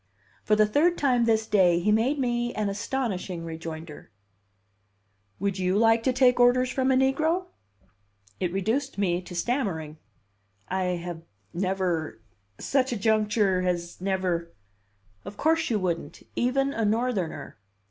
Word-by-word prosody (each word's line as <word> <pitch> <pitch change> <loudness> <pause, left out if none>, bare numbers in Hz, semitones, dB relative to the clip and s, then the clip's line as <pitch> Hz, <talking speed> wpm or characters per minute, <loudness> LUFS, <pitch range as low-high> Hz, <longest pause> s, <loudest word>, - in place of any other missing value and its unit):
For 215 - +3
the 215 0 +5
third 310 +11 +2
time 250 -4 +2
this 220 -1 +2
day 185 -5 +3
he 210 +5 +1
made 235 +7 +2
me 240 -2 -1
an 210 -1 -1
astonishing 200 -5 -3
rejoinder: 160 -1 -8 1.3
"Would 195 0 -1
you 185 +1 +1
like 225 +1 +4
to 260 - +1
take 250 -1 +3
orders 250 +1 +4
from 260 0 0
a - - +4
negro?" 310 +7 +1 0.9
It 180 -2 -1
reduced 225 +9 -1
me 180 -3 0
to 180 0 -10
stammering. 175 - -2 0.7
"I 190 0 -1 0.2
have 175 -2 -6 0.3
never 180 - -1 0.4
such 265 -2 0
a 240 - -1
juncture 210 -2 +2
has 175 -1 -3
never 185 -3 -1 0.4
" 100 0 -38
"Of 200 +1 -9
course 325 +1 +1
you 225 - +1
wouldn't. 170 -6 -3
Even 270 +3 +1
a 225 - -1
Northerner!" 215 - -2
210 Hz, 140 wpm, -26 LUFS, 180-250 Hz, 1.3 s, the